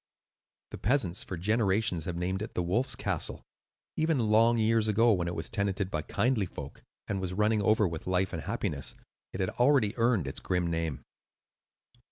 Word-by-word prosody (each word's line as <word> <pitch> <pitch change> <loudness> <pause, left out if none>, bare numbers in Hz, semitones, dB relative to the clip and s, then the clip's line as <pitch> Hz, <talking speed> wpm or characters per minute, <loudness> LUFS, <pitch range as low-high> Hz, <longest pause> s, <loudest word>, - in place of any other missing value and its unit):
The - - -7
peasants 105 -6 +1
for 95 - -6
generations 100 -2 +1
have 90 - -3
named 90 +3 -2
it 110 - -6
"The 90 - 0
Wolf's 110 +10 +1
Castle." - - -2 0.5
Even 160 -1 +1
long 115 +2 +5
years 110 0 +2
ago, 115 +2 +4
when 90 -3 -1
it 85 - -3
was 80 - -3
tenanted 100 -2 -2
by 75 - -1
kindly 110 - 0
folk 70 -4 -9 0.3
and 100 -2 -2
was 90 -1 -3
running 105 +1 +2
over 105 0 +3
with 80 -1 -6
life 95 0 +1
and - - -3
happiness, - - -2 0.4
it 95 - -4
had 95 - 0
already 125 -4 +3
earned 115 - +2
its 65 - -3
grim 90 -1 -1
name. 80 -4 -2
100 Hz, 180 wpm, -29 LUFS, 90-115 Hz, 0.5 s, long